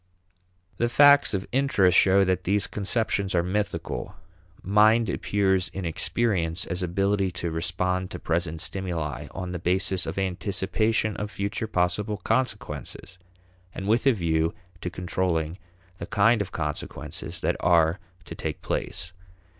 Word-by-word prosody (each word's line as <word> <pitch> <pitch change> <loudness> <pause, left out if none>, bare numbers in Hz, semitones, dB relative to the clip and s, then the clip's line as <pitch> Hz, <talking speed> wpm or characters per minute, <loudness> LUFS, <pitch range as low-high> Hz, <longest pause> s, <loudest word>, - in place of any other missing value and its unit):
The 120 - +1
facts 140 -1 +6
of 95 - -3
interest 120 -9 +3
show 95 +1 +6
that 95 -1 0
these 100 +2 +1
conceptions 100 -2 0
are 85 - +3
mythical. 100 -1 -3 0.5
Mind 105 +2 +4
appears 95 -2 +1
in 95 -1 -3
experience 90 0 0
as 90 +1 -3
ability 100 +2 +1
to 85 -1 -3
respond 90 +2 -1
to - - -6
present 80 -1 -2
stimuli 85 -7 -3
on 90 -1 -6
the 90 - -4
basis 90 +1 +1
of - - -4
anticipation 100 +3 0
of 105 - -3
future 100 +2 -3
possible 105 +2 0
consequences, 110 -4 -3 0.6
and 95 - -5
with 115 +5 +2
a - - +8
view 80 -4 0 0.3
to 90 - -3
controlling 90 -1 -2 0.4
the 85 - -6
kind 110 +1 +3
of 95 -3 -4
consequences 75 -2 -5
that - - +1
are 85 0 +3 0.3
to - - -8
take - - -5
place. 85 +2 -3
95 Hz, 140 wpm, -26 LUFS, 90-105 Hz, 0.6 s, a